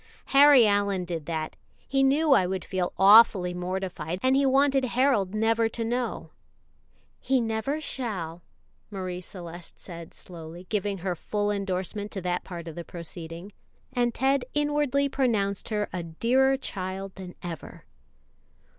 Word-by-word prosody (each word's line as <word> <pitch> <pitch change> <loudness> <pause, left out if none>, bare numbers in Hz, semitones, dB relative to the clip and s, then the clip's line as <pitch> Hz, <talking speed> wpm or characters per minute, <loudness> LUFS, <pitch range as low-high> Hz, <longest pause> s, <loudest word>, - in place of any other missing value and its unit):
"Harry 275 -3 +8
Allyn 200 -3 +1
did 165 -4 -5
that. 160 -2 -3 0.3
He 270 0 +1
knew 285 +3 +3
I 190 -9 +5
would 190 0 -3
feel 185 -2 -2
awfully 195 -2 +7
mortified, 180 -1 -3
and 260 +1 +4
he 275 0 +3
wanted 270 0 +3
Harold 250 -6 +1
never 225 +1 +2
to 230 0 -4
know." 240 +1 -3 0.9
"He 265 -1 +1
never 225 +6 -1
shall," 190 - -4 0.5
Marie 185 -3 -5
Celeste 175 -2 -8
said 170 -2 -9
slowly, 170 0 -10
giving 205 -1 -1
her 180 0 -2
full 205 +5 -2
endorsement 200 +1 -2
to 195 - -4
that 180 0 -1
part 170 -2 -8
of 165 - -6
the 170 - -6
proceeding, 170 +2 -8 0.4
and 240 -2 +1
Ted 270 +2 +1
inwardly 295 -1 +1
pronounced 220 -8 0
her 210 -2 -1
a 180 - -2
dearer 250 +11 +2
child 190 -5 -5
than 185 -2 -9
ever. 170 -4 -8
200 Hz, 145 wpm, -27 LUFS, 180-255 Hz, 0.9 s, Harry